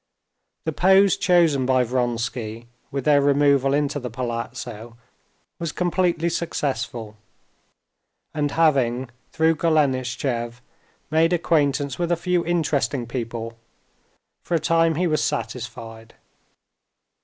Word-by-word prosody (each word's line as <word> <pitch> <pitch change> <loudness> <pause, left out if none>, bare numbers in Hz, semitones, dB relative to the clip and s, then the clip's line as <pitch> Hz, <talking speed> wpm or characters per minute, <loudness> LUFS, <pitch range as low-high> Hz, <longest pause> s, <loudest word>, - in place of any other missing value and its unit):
The 160 - 0
pose 190 +3 +4
chosen 165 -8 +3
by 130 -1 +3
Vronsky 120 -2 -2 0.2
with 140 -2 -4
their 145 -1 +5
removal 140 -1 +3
into 145 0 0
the 125 -2 -5
palazzo 115 -1 -5 0.6
was 170 -2 -3
completely 175 -2 0
successful, 130 -9 -3 1.2
and 150 -2 0
having, 130 -6 +1 0.2
through 160 0 +2
Golenishtchev, 130 -6 0 0.5
made 165 +2 +3
acquaintance 145 -5 +1
with 175 0 -1
a 175 - +2
few 175 0 0
interesting 150 -6 0
people, 115 -1 -5 0.8
for 175 - -1
a - - +2
time 165 0 +2
he 180 +4 0
was 155 -3 +1
satisfied. 115 0 -5
140 Hz, 110 wpm, -23 LUFS, 120-165 Hz, 1.2 s, their